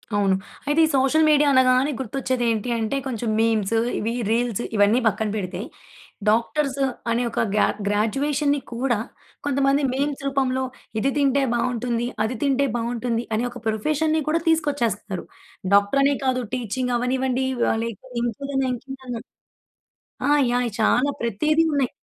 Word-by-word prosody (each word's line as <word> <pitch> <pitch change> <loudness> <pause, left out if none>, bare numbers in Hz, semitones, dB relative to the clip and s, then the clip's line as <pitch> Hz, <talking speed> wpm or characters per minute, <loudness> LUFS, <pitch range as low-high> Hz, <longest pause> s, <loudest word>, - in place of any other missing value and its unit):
అవును. 195 -2 +3 0.3
అయితే 295 +2 +2
ఈ - - +1
సోషల్ 275 +4 +3
మీడియా 295 -1 +5
అనగానే, 260 +2 +4
గుర్తొచ్చేదేంటి 245 -3 -1
అంటే, 225 +5 -1
కొంచెం 235 -3 -3
మీమ్స్, 225 -2 +1 0.2
ఇవీ 225 +2 -1 0.2
రీల్స్, 240 -1 0
ఇవన్నీ 205 +3 +4
పక్కన 220 0 0
పెడితే, 185 -3 -4 0.7
డాక్టర్స్ 275 +5 +1 0.3
అనే 235 +2 +1
ఒక - - -2 0.2
గ్యా 210 - +4 0.2
గ్రాడ్యుయేషన్‌ని 275 +8 +1
కూడా, 240 -2 0 0.5
కొంతమంది 275 0 +2
మీమ్స్ 280 +1 -1
రూపంలో 265 -1 0 0.4
ఇది 270 +5 +1
తింటే 280 -1 +3
బావుంటుంది, 240 0 -1 0.2
అది 225 +3 -2
తింటే 280 0 +2
బావుంటుంది, 235 0 -1
అనే 225 - 0
ఒక 245 0 -9
ప్రొఫెషన్‌ని 310 +8 +1
కూడా 325 +2 +2
తీసుకొచ్చేస్తున్నారు. 240 - 0 0.5
డాక్టరనే 275 +8 +4
కాదు 255 -1 +1
టీచింగవ్వనివ్వండీ 250 +2 -1 0.3
ఆహ్, 225 - 0
లేక 230 -4 -5 0.2
ఇంకేదన్నా, 270 +3 -2
ఇంకేదన్నా. 260 -2 -7 1.1
ఆ! - - +2 0.2
యాహ్! 245 - +2
అయి 225 - -4
చాలా 255 +6 +3
ప్రతీది 305 +9 +2
ఉన్నాయి. 270 -3 +1
255 Hz, 130 wpm, -23 LUFS, 230-275 Hz, 1.1 s, మీడియా